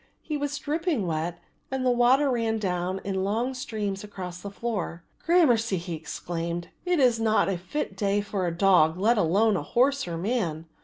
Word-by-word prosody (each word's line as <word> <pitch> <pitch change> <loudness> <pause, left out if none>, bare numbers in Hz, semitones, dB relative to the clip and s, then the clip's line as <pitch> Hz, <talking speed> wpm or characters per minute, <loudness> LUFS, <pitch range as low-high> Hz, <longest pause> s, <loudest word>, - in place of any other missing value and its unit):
He 305 - -3
was 290 0 -2
dripping 310 - -1
wet 165 +1 -2 0.3
and 265 -1 -2
the 250 - +4
water 255 +4 +4
ran 230 -2 0
down 185 -2 -2
in 190 -1 -1
long 230 +6 0
streams 210 -6 -4
across 180 -4 -7
the 200 - -6
floor. 200 -6 -4 0.2
"Gramercy," 245 - +3
he 175 0 -5
exclaimed, 170 +1 -4 0.2
"it 355 -2 +2
is 245 -4 +4
not 220 -1 +3
a 195 - 0
fit 190 +5 -4
day 200 +1 +1
for 200 -3 -2
a - - 0
dog 175 -4 +4
let 220 +4 +3
alone 205 +5 +3
a 175 - -1
horse 255 - +1
or 170 - -4
a - - -3
man. 170 -5 -1
205 Hz, 190 wpm, -26 LUFS, 180-245 Hz, 0.3 s, the